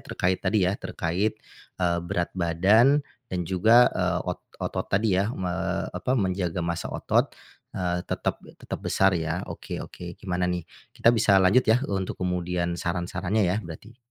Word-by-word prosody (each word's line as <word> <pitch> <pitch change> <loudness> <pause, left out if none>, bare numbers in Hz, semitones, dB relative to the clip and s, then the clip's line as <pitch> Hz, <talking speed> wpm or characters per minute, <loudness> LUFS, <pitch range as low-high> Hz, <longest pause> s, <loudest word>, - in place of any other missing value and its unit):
terkait 90 +1 -1
tadi 100 0 +2
ya, 95 +3 -1
terkait, 90 +6 -1 0.4
eee, 85 -1 +1
berat 85 0 -2
badan, 100 - +4 0.2
dan 90 -2 -2
juga, 110 +7 +5
eee, 90 -1 0
ot - - -5 0.2
otot - - -3
tadi 105 +1 +2
ya 100 +3 +2
me 90 -2 -2 0.4
apa 130 +1 -1
menjaga 90 -4 -1
massa 85 0 -2
otot, - - +1 0.5
eee, 90 -1 -1
tetap - - -2 0.2
tetap - - -6
besar 95 0 +2
ya, 80 +1 -2
oke - - -6
oke 90 -1 -9
gimana 90 -1 -1
nih, 90 -2 -2 0.3
kita 115 - +5
bisa 105 -3 +4
lanjut 95 +6 +5
ya 110 - +6 0.2
untuk 95 -1 -2
kemudian 90 -1 -1
saran-sarannya 90 +4 -1
ya 90 +3 +1
berarti? 100 +7 -11
90 Hz, 155 wpm, -26 LUFS, 85-100 Hz, 0.5 s, ya